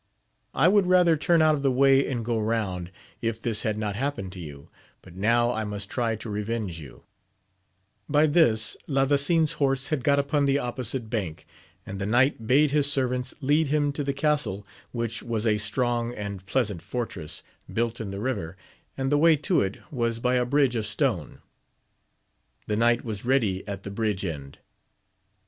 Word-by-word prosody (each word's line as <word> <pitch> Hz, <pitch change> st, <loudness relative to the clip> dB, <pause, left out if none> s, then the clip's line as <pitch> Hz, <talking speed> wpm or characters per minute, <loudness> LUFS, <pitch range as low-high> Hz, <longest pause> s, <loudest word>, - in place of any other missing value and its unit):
I 145 Hz, +6 st, +4 dB
would 200 Hz, -1 st, +4 dB
rather 180 Hz, -2 st, +5 dB
turn 165 Hz, +1 st, +3 dB
out 155 Hz, 0 st, +5 dB
of 145 Hz, -, -2 dB
the 140 Hz, -, +2 dB
way 135 Hz, +1 st, +4 dB
and 120 Hz, -4 st, -3 dB
go 115 Hz, -1 st, 0 dB
round, 105 Hz, -5 st, -2 dB, 0.3 s
if 115 Hz, -1 st, -2 dB
this 115 Hz, -3 st, 0 dB
had 110 Hz, -3 st, -1 dB
not 105 Hz, -2 st, -2 dB
happened 120 Hz, -6 st, -3 dB
to 95 Hz, -, -10 dB
you, 70 Hz, -4 st, -9 dB, 0.4 s
but 85 Hz, -, -14 dB
now 120 Hz, +5 st, +2 dB
I 110 Hz, -2 st, -2 dB
must 105 Hz, -1 st, -4 dB
try 115 Hz, -3 st, 0 dB
to 110 Hz, +2 st, -8 dB
revenge 105 Hz, -4 st, -3 dB
you, 75 Hz, -4 st, -12 dB, 1.1 s
By 150 Hz, +1 st, +4 dB
this, 145 Hz, -9 st, +3 dB
Ladasin's 145 Hz, +3 st, +2 dB
horse 135 Hz, -1 st, +1 dB
had 150 Hz, -5 st, -1 dB
got 140 Hz, +1 st, +3 dB
upon 140 Hz, 0 st, +1 dB
the 135 Hz, 0 st, +3 dB
opposite 125 Hz, -2 st, -3 dB
bank, 95 Hz, -9 st, -3 dB, 0.4 s
and 95 Hz, +1 st, -6 dB
the 100 Hz, -, -2 dB
knight 120 Hz, 0 st, +2 dB
bade 145 Hz, +4 st, +4 dB
his 145 Hz, -1 st, +3 dB
servants 125 Hz, -2 st, -1 dB
lead 145 Hz, +3 st, +2 dB
him 145 Hz, 0 st, +1 dB
to 145 Hz, +1 st, -4 dB
the 140 Hz, -, -1 dB
castle, 140 Hz, -9 st, -1 dB, 0.3 s
which 115 Hz, -2 st, -3 dB
was 115 Hz, -1 st, -3 dB
a 105 Hz, -2 st, +2 dB
strong 120 Hz, +3 st, -1 dB
and 100 Hz, -2 st, -6 dB
pleasant 105 Hz, -7 st, -1 dB
fortress, 85 Hz, -10 st, -6 dB, 0.3 s
built 115 Hz, 0 st, -1 dB
in 105 Hz, -, -5 dB
the 100 Hz, 0 st, -5 dB
river, 100 Hz, -8 st, -3 dB, 0.4 s
and 135 Hz, 0 st, -1 dB
the 145 Hz, -, +3 dB
way 165 Hz, +1 st, +6 dB
to 155 Hz, +5 st, +1 dB
it 95 Hz, +1 st, -2 dB
was 115 Hz, -4 st, -1 dB
by 125 Hz, +1 st, +1 dB
a 125 Hz, -1 st, +2 dB
bridge 135 Hz, -1 st, +2 dB
of 110 Hz, -2 st, -1 dB
stone. 105 Hz, -1 st, -1 dB, 1.2 s
The 105 Hz, -, -1 dB
knight 120 Hz, +2 st, +2 dB
was 105 Hz, -3 st, -5 dB
ready 115 Hz, -7 st, +1 dB
at 100 Hz, -1 st, -6 dB
the 100 Hz, -, -6 dB
bridge 105 Hz, -2 st, -1 dB
end. 70 Hz, -5 st, -6 dB
120 Hz, 180 wpm, -26 LUFS, 105-140 Hz, 1.2 s, way